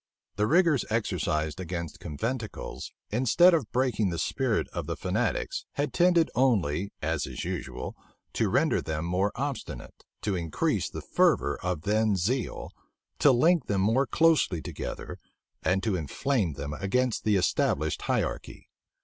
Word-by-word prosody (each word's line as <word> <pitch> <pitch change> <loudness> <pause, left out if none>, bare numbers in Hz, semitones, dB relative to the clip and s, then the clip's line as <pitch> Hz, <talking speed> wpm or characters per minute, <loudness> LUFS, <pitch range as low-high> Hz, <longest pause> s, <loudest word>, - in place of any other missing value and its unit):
The 105 +2 +1
rigors 165 -1 +4
exercised 85 -8 -1
against 85 -2 -5
conventicles, 115 - -5 0.2
instead 130 - +5
of 150 -10 0
breaking 120 -5 +1
the 85 - -3
spirit - - 0
of - - -5
the - - -2
fanatics, - - -1
had 145 -1 -2
tended 175 -2 +4
only, 100 - +1
as 80 -1 -1
is - - -5
usual, 65 - -5 0.4
to - - +1
render - - +2
them 80 0 -3
more 95 +4 +1
obstinate, 125 - -5 0.2
to 105 -3 0
increase 85 -3 -1
the - - -7
fervor - - +2
of 90 -4 -2
then 105 +1 +2
zeal, 115 +6 -2 0.5
to 145 - +6
link 160 +7 +3
them 100 -2 +1
more 115 +7 +2
closely 160 - +3
together, - - -6 0.4
and 95 +1 +1
to 110 -4 +1
inflame 90 - -1
them 70 +1 -5
against 110 +9 0
the 105 -1 +3
established 80 -4 +1
hierarchy. - - -3
105 Hz, 140 wpm, -28 LUFS, 85-130 Hz, 0.5 s, to